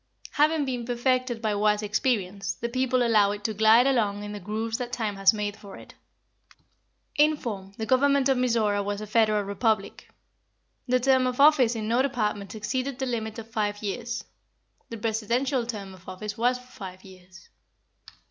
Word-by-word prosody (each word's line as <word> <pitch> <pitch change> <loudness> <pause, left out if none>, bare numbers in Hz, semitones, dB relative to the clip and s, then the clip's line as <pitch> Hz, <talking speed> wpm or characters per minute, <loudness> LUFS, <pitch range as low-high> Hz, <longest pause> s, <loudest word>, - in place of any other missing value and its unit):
Having 300 0 +2
been 250 -3 -3
perfected 245 0 -1
by 215 -1 +1
wise 210 +1 +1
experience, 200 -4 -1
the 235 - -4
people 255 0 +1
allow 215 -4 +4
it 205 0 -8
to 220 -1 -1
glide 220 +3 +5
along 210 -6 +1
in 205 - -6
the 205 - -6
grooves 220 +4 -3
that 245 -1 -4
time 220 -4 -2
has 195 0 +6
made 210 -2 -3
for 200 -2 -12
it. - - -14 1.2
In 300 +1 +4
form, 195 -7 -6
the 220 - -3
government 275 +2 +3
of 270 - +3
Mizora 230 -5 +1
was 205 0 -3
a 215 - -5
Federal 215 -1 +2
Republic. 200 +1 -1 0.8
The 255 0 +3
term 260 0 +3
of 250 +1 -3
office 280 -5 +5
in 215 -1 -3
no 235 +3 +2
department 215 -7 -2
exceeded 255 +5 -3
the 265 - -2
limit 220 -3 -3
of 225 0 -9
five 205 -1 -2
years. 235 +4 -4 0.7
The 230 - -6
Presidential 235 +4 -1
term 200 -5 -6
of 185 0 -13
office 205 +3 -6
was 245 +2 +1
for 250 - -16
five 185 -2 -9
years. 185 -2 -16
225 Hz, 175 wpm, -26 LUFS, 205-250 Hz, 1.2 s, has